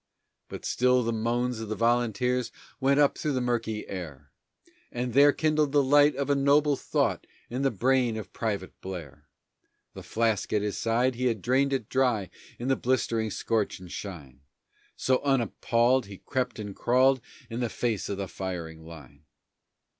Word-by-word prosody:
But - - -8
still 125 0 +3
the 115 0 -1
moans 120 +2 -1
of 110 -2 -6
the 110 - -2
volunteers 120 +2 +1 0.3
went 140 +1 +3
up 145 -1 +4
through 150 - -1
the 130 - 0
murky 115 -3 -2
air, 85 -8 -8 0.6
And 125 0 -3
there 145 +2 +7
kindled 155 -1 +1
the 145 -1 +5
light 145 +2 +5
of 140 0 -2
a 145 - +3
noble 140 +1 +3
thought - - -1 0.2
in 125 +2 -2
the 135 - +3
brain 125 +1 +1
of 110 - -8
Private 100 -5 -3
Blair. 90 -7 -8 0.7
The - - -9
flask 110 -2 -1
at 105 -1 +2
his 105 -1 -2
side, 120 +3 +1
he 125 +2 -1
had 115 -3 0
drained 135 +3 +2
it 130 -6 -1
dry 125 -7 +1 0.3
in 120 - -5
the 135 - +3
blistering 115 -3 0
scorch 110 0 -1
and 90 -2 -11
shine, 70 -9 -8 0.6
So, 130 -1 +1
unappalled, 125 -2 +2
he 100 -1 -9
crept 130 +2 -3
and 105 -2 -6
crawled 130 +1 +3 0.3
in 115 -1 -5
the 120 -2 -1
face 115 -4 -2
of 100 - -3
the 100 -1 -3
firing 85 -4 -6
line. 75 -3 -13
120 Hz, 170 wpm, -27 LUFS, 105-130 Hz, 0.7 s, there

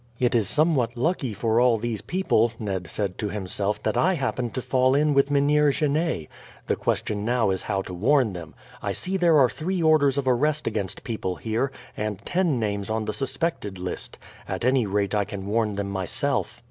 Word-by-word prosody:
"It 125 0 +1
is 110 -5 +2
somewhat 140 -7 +2
lucky 150 -1 0
for 110 +2 +1
all 125 -2 +4
these 110 -1 -3
people," 120 -11 +1
Ned 95 -5 -3
said 100 -3 -3
to 105 - -1
himself, 100 +1 -2
"that - - 0
I 185 +2 +3
happened 130 -4 -2
to 130 - -1
fall 130 0 +3
in 150 +1 +3
with 140 0 +3
Mynheer 145 +1 +3
Genet. 150 - 0 0.4
The - - +1
question 105 -1 -1
now 115 -3 +2
is 95 - -2
how 100 -2 -2
to 90 - -8
warn 120 +3 +2
them. 85 -3 -9 0.3
I - - -2
see 190 +1 -3
there 170 -4 +4
are 135 -3 +6
three 175 +6 -2
orders 145 -4 +4
of 140 -2 -1
arrest 150 +5 +2
against 105 -4 -3
people 105 -6 -3
here, 115 +7 -1 0.2
and 105 -1 -3
ten 175 -8 +1
names 100 -2 -2
on 110 0 -1
the 105 - -2
suspected 130 - -2
list. 90 0 -5 0.3
At - - -3
any 130 -3 +3
rate 100 +1 0
I 105 -1 +2
can 100 -1 -7
warn 105 0 0
them 100 0 -3
myself." 95 -2 -2
120 Hz, 200 wpm, -25 LUFS, 100-145 Hz, 0.4 s, are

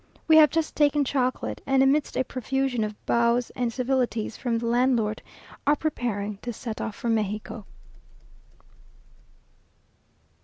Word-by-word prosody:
We 315 -1 +7
have 305 -2 +8
just 325 -1 -1
taken 295 -1 +3
chocolate, 255 -1 -1
and, 270 0 +4
amidst 285 +2 +1
a 260 - +2
profusion 260 -1 -1
of 210 0 -4
bows 235 +1 +2
and 245 -2 -2
civilities 245 -3 -1
from 240 -3 -1
the 230 - -3
landlord, 235 -3 +1 0.5
are 290 - +5
preparing 215 -10 -3
to 240 +4 -6
set 225 -1 -6
off 220 - -4
for - - -5
Mexico. 215 -1 -2
245 Hz, 130 wpm, -25 LUFS, 225-270 Hz, 0.5 s, have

